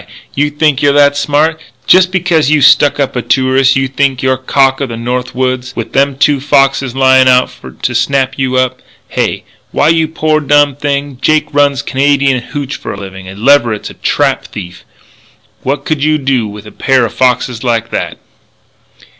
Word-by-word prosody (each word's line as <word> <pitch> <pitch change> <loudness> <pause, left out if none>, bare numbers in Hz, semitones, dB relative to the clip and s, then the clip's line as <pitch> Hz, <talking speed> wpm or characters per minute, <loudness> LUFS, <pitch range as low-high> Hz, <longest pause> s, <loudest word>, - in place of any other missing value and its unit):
You 145 +1 0
think 150 -2 0
you're 145 -1 +3
that 145 0 +4
smart? 150 +3 0 0.2
Jest 185 0 +4
becuz 175 -6 +1
you 155 0 +3
stuck 145 +1 +4
up 140 -2 -1
a 125 - -1
tourist 130 +2 +2
you 135 0 0
think 135 -1 -1
you're 130 0 +2
cock 135 +1 +1
o' 140 - -1
the 115 -2 -7
North 125 +2 -4
Woods 130 -1 -2
with 115 - -6
them 140 0 +1
two 140 +1 +2
foxes 135 -2 +1
lyin' 130 -1 +4
out 125 0 +3
for - - -13
to 125 - -4
snap 135 +2 0
you 130 -1 -1
up? 130 0 0 0.3
Hey? - - -2 0.3
Why, 150 - +2
you 160 -1 +2
poor 155 -1 0
dumb 145 -1 +2
thing, 140 -2 -3
Jake 155 +1 +1
runs 140 -1 +1
Canadian 140 -2 +1
hootch 140 +2 -6
for - - -7
a - - -7
livin' 95 -1 -9
and 95 +2 -10
Leverett's 120 -7 +2
a - - -12
trap - - -1
thief! 90 -5 -9 0.8
What 140 +6 -3
could 155 -5 -2
you 155 0 +2
do 130 -5 -1
with 105 0 -10
a 105 - -11
pair 130 -2 +1
o' - - -3
foxes 125 -1 -1
like 115 -2 -1
that?" - - -3
135 Hz, 190 wpm, -12 LUFS, 125-145 Hz, 0.8 s, that